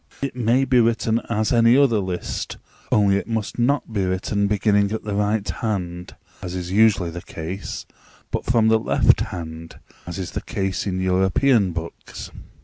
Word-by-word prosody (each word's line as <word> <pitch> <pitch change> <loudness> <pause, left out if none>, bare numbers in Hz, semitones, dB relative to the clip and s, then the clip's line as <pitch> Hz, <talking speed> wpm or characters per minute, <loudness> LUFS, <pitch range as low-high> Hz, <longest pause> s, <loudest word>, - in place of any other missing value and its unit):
It 140 -2 -3
may 125 +2 +2
be 130 -1 +3
written 115 0 +2
as 110 0 0
any 115 +1 +5
other 130 -6 +4
list, 95 -2 -4 0.3
only 100 -2 +4
it - - -4
must 110 -1 -3
not 125 -1 +1
be 100 -3 0
written 95 +2 0
beginning 105 0 +2
at 110 - -3
the 105 - -4
right 105 0 0
hand, 90 -6 -4 0.3
as 90 0 -5
is 90 -1 -4
usually 100 -4 +3
the 85 +1 -7
case, 85 +5 -6 0.5
but - - -2
from 115 -2 +3
the 110 0 +4
left - - +3
hand 80 -1 -6 0.3
(as 85 - -5
is 95 -3 -5
the - - -4
case 95 0 -3
in 95 -1 -1
European 95 +4 +2
books). 85 0 -7
100 Hz, 170 wpm, -22 LUFS, 95-115 Hz, 0.5 s, any